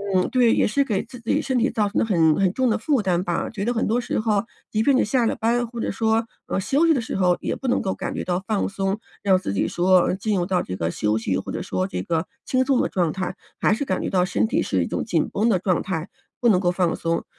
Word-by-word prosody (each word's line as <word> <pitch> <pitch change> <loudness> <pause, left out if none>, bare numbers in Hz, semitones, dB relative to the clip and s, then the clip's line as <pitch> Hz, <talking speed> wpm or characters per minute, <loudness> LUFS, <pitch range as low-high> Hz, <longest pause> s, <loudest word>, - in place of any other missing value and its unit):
嗯， 185 - +2
对， 245 -3 +4
也 - - +3
是 280 +6 +2
给 210 -7 -1
自 250 - -12
己 290 +6 0
身 260 -4 -1
体 245 +3 +2
造 210 -2 0
成 - - -1
了 - - +2
很 165 -7 +3
很 190 -2 +3
重 260 -2 +1
的 220 - +2
负 265 +1 +1
担 180 -2 0
吧， 175 -3 -2
觉 205 -3 -5
得 240 - +1
很 230 - 0
多 235 +3 +1
时 - - -2
候 215 -2 +1 0.3
即 215 - +1
便 275 +1 +4
你 - - +3
下 235 +2 +1
了 - - 0
班 240 +2 +1
或 235 0 -8
者 - - -1
说， 225 +2 +1 0.2
呃， - - -1
休 280 - +2
息 325 - +5
的 265 - +1
时 - - -5
候 180 -2 +2
也 - - -2
不 265 - -6
能 - - +2
够 190 - -1
感 - - -5
觉 - - -3
到 180 +1 -2
放 215 -2 0
松， 195 +1 -2 0.2
让 190 -2 +4
自 100 - -4
己 95 - 0
说， 185 +1 +4
呃， - - 0
进 205 0 -1
入 175 - 0
到 185 -1 +1
这 90 - -5
个 85 -1 -2
休 105 +1 0
息， 100 -4 -1
或 - - -6
者 - - -4
说 95 0 -2
这 90 -1 -4
个 165 +1 -1 0.2
轻 260 0 +2
松 270 -2 +2
的 - - 0
状 175 -4 0
态， 190 -1 -3 0.2
还 - - +3
是 275 +6 -2
感 185 - -1
觉 - - -2
到 180 -1 +2
身 220 - 0
体 - - +1
是 95 -3 0
一 - - -3
种 - - -2
紧 170 -8 0
绷 215 +3 0
的 190 -5 +2
状 185 -2 +1
态， 175 -3 -4 0.3
不 240 - +4
能 185 -4 +4
够 175 -2 +1
放 180 -2 +1
松。 165 0 -1
195 Hz, 315 characters per minute, -23 LUFS, 180-230 Hz, 0.3 s, 息